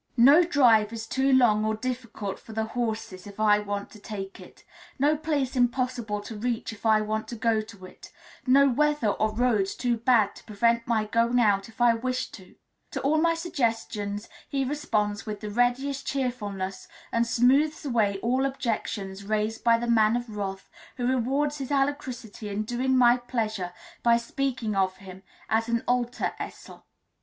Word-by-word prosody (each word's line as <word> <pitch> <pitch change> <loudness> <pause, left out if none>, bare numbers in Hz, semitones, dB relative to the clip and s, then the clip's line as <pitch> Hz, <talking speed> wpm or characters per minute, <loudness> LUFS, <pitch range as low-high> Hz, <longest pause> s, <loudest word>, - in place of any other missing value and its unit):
No 280 +9 +7
drive 240 -10 +4
is 225 -1 -5
too 265 +4 +1
long 235 -5 +4
or 220 0 0
difficult 230 -4 -5
for 225 - -12
the 220 0 -1
horses 220 -4 -4
if 200 +1 -12
I 210 -1 +4
want 205 -1 -4
to 215 - -13
take 195 -2 -7
it, 180 - -15 0.3
no 290 +3 +3
place 295 -4 -1
impossible 245 -4 0
to 220 +2 -8
reach 230 +1 -2
if 220 +1 -4
I 215 -1 +5
want 215 +1 -2
to 240 - -6
go 225 -1 +1
to 205 -3 -12
it, 185 - -14 0.4
no 275 +2 +6
weather 295 -2 +2
or 215 +1 0
roads 215 -4 +1
too 240 -2 0
bad 225 -3 +3
to - - -14
prevent 230 +2 +1
my 220 -2 +1
going 230 +3 +2
out 205 -3 +2
if 225 - -19
I 240 -1 +5
wish 255 +2 -2
to: 185 -3 -13 0.3
to - - -4
all 310 +3 +2
my 335 0 +3
suggestions 225 -9 -2 0.2
he 275 -1 0
responds 215 -8 -1
with 210 -1 -4
the 210 -1 -5
readiest 250 +4 0
cheerfulness, 205 -8 -3 0.2
and 230 0 +1
smoothes 275 +7 +2
away 220 -7 +1
all 255 +3 +1
objections 215 -7 -3
raised 215 +2 -2
by 230 -1 +5
the 235 - -3
Man 225 -1 +4
of 240 -3 -4
Wrath, 195 -1 -4 0.3
who 245 - -2
rewards 270 +4 0
his 270 - -5
alacrity 265 -6 -2
in 205 +1 -2
doing 255 +4 0
my 245 -1 +6
pleasure 220 -7 -3 0.3
by 235 -1 +4
speaking 235 -2 -2
of 190 -1 +1
him 190 -1 -11 0.3
as 225 +1 0
an 235 0 0
alter 245 0 0
Esel. - - -9
230 Hz, 175 wpm, -26 LUFS, 210-255 Hz, 0.4 s, No